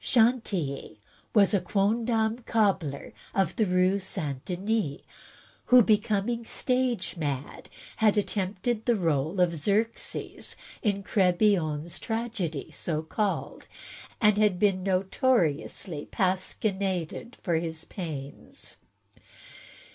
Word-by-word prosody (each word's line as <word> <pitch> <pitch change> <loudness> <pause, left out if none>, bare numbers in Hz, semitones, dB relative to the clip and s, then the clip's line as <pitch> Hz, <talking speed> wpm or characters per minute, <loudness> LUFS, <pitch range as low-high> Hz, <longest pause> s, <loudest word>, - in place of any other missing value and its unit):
Chantilly 220 - +1 0.4
was 200 0 +5
a 200 - +3
quondam 220 +4 +1
cobbler 190 -11 0 0.2
of 190 -4 +1
the 220 - +2
Rue 185 +2 +3
St. 155 -8 -4
Denis, 185 -4 -1 0.6
who, 250 -1 +7
becom 210 -1 +2
ing 235 -1 -2
stage 250 -3 0
mad, 145 -4 -4 0.3
had 215 -1 +3
attempted 210 +3 -1
the 240 - +4
role 165 -1 0
of 175 -1 +3
Xerxes, 210 +8 -2 0.3
in 200 -3 0
Crebillon's 175 -5 +2
tragedy 220 - -3
so 155 -2 -2
called, 200 +5 -2 0.5
and 210 -3 +4
been 195 -1 +2
notoriously 185 - 0
pasquinaded 190 +1 -1
for 175 - 0
his 160 0 -3
pains. 145 -7 -7
195 Hz, 100 wpm, -28 LUFS, 170-220 Hz, 0.6 s, who